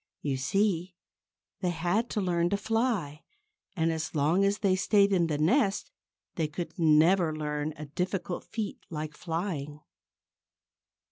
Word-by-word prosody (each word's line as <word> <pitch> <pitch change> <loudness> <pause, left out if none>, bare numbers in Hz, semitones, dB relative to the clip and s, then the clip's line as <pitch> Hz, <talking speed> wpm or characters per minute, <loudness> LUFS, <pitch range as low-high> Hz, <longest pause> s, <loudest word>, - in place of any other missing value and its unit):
You 140 -2 0
see, 180 +5 0 0.6
they 180 - 0
had 175 +7 0
to 210 - -1
learn 175 -2 +1
to 200 - +1
fly. 210 - -1 0.5
And 165 -2 0
so 155 0 -4
long 160 +7 +3
as 200 +1 +2
they 195 -3 +2
stayed 200 +1 +3
in 175 -3 +3
the 150 -2 -1
nest 195 - +2 0.5
they 160 -3 +1
could 170 +5 -6
never 160 +1 +4
learn 150 0 -3
a 150 - -6
difficult 180 +4 -3
feat 220 -3 -4
like 155 -2 -5
flying. 160 -4 -4
175 Hz, 140 wpm, -29 LUFS, 155-195 Hz, 0.6 s, never